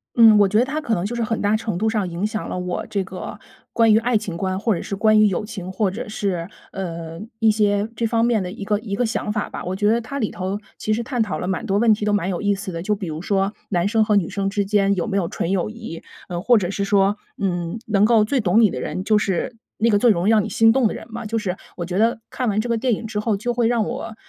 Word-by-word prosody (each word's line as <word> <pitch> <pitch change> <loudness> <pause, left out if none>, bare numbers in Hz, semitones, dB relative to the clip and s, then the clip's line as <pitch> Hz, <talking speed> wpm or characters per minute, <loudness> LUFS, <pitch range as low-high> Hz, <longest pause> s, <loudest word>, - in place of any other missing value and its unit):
嗯， 225 -2 +8
我 205 - +6
觉 210 +2 +1
得 240 - +4
它 300 +4 -3
可 230 -7 0
能 175 - -2
就 235 +4 -3
是 235 - -1
很 225 0 -1
大 205 +1 +2
程 215 -4 -2
度 220 +4 +1
上 210 -5 -1
影 175 +4 -2
响 215 0 -3
了 - - -3
我 180 -1 -3
这 200 -2 -1
个 190 +2 -7 0.3
关 225 -2 +4
于 215 - +6
爱 235 0 +2
情 200 -5 -5
观， 185 +2 -2
或 220 +1 +1
者 170 - -3
是 200 - -4
关 215 +1 +4
于 215 - +6
友 200 +2 -1
情， 190 -4 -6
或 190 0 0
者 215 +2 -6
是， 190 -5 -2 0.2
呃， 165 -3 -6 0.2
一 225 -2 +5
些 205 -1 +1
这 230 0 0
方 230 0 +2
面 235 -3 +2
的 180 -1 -4
一 205 0 -7
个 210 0 +1
一 210 -3 -4
个 245 - +1
想 220 -1 -2
法 210 -1 -2
吧。 - - -6
我 180 +1 -3
觉 205 +2 +1
得 230 +2 +3
它 245 +5 -6
里 220 -7 -1
头 190 +2 -3 0.2
其 215 - -2
实 225 +2 +1
探 245 -1 -2
讨 215 - -1
了 180 - -4
蛮 185 -3 -2
多 195 - +1
问 220 +1 +5
题 210 - -3
都 210 - +1
蛮 190 -3 +1
有 175 - -3
意 205 0 +2
思 195 -1 -6
的， 165 -1 -5
就 210 +4 0
比 195 - -6
如 155 0 -5
说 195 +1 0 0.2
男 175 -1 +1
生 220 +1 +3
和 210 -1 +2
女 190 -5 +2
生 195 -1 -2
之 200 0 -1
间 200 -1 +2
有 175 - -1
没 200 - -1
有 180 -4 0
纯 170 - -2
友 195 0 0
谊， 220 -7 -8 0.3
呃， 175 -1 -3
或 240 +4 +5
者 185 -3 -1
是 200 - -2
说， 200 0 +2 0.2
嗯， 175 -1 -2
能 205 -2 +2
够 220 0 +5
最 265 +5 0
懂 205 -1 +3
你 215 -5 +5
的 - - -4
人 185 - -3
就 210 +1 +3
是， 200 +3 -1 0.2
那 225 - +2
个 205 - +4
最 240 - +5
容 185 -3 +2
易 - - +5
让 215 -2 +4
你 - - -4
心 225 0 +5
动 250 0 +3
的 - - -3
人 - - -8
嘛， 235 -1 -5
就 225 +2 -1
是 190 -5 -2 0.2
我 175 - -4
觉 180 +2 -2
得 225 +1 +2
看 250 -3 -1
完 210 0 0
这 225 - -1
个 235 - +2
电 245 0 +1
影 225 - -7
之 215 -1 -3
后 210 -1 0
就 240 +4 -2
会 235 -1 +2
让 235 -2 +2
我 240 -3 -5
210 Hz, 325 characters per minute, -22 LUFS, 190-225 Hz, 0.3 s, 嗯